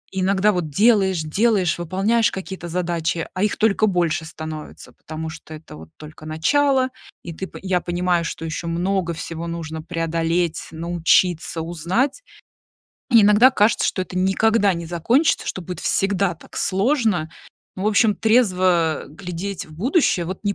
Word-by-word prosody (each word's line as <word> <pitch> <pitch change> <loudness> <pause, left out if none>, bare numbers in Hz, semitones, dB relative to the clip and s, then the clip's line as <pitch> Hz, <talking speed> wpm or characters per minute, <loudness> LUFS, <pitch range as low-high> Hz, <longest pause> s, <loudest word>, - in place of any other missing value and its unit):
Иногда 190 +2 +2
вот 175 -5 -2
делаешь, 195 0 +3
делаешь, 185 0 +1
выполняешь 195 +7 +1
какие-то 190 -2 -7
задачи, 170 -2 -2
а 185 +2 -1
их 210 - 0
только 215 0 +2
больше 170 -4 0
становится. 160 -1 -8
Потому 160 0 -7
что 160 -1 -10
это 155 +1 -12
вот 80 +1 -12
только 155 0 -11
начало, 260 - +2 0.3
и 170 - -7
ты 190 +4 -6
по - - -11
я 185 -2 0
понимаю, 175 -1 0
что 165 0 -5
еще 165 +1 -4
много 175 +1 -1
всего 165 +1 -6
нужно 160 -2 -5
преодолеть, 165 0 -1
научиться, 170 0 +1
узнать. 180 - -1 0.9
Иногда 220 +2 +6
кажется, 215 -3 +2
что 185 - -2
это 185 0 -8
никогда 200 +2 +2
не 170 0 -6
закончится, 230 - +1
что 185 - -4
будет 180 0 -7
всегда 195 -2 +1
так - - -15
сложно. 205 - +1 0.5
В 190 - -4
общем, 215 0 +3
трезво 185 - +2
глядеть 180 +3 -6
в 155 - -14
будущее 205 - +1
вот 185 +3 -6
не 200 -1 0
180 Hz, 150 wpm, -21 LUFS, 165-205 Hz, 0.9 s, Иногда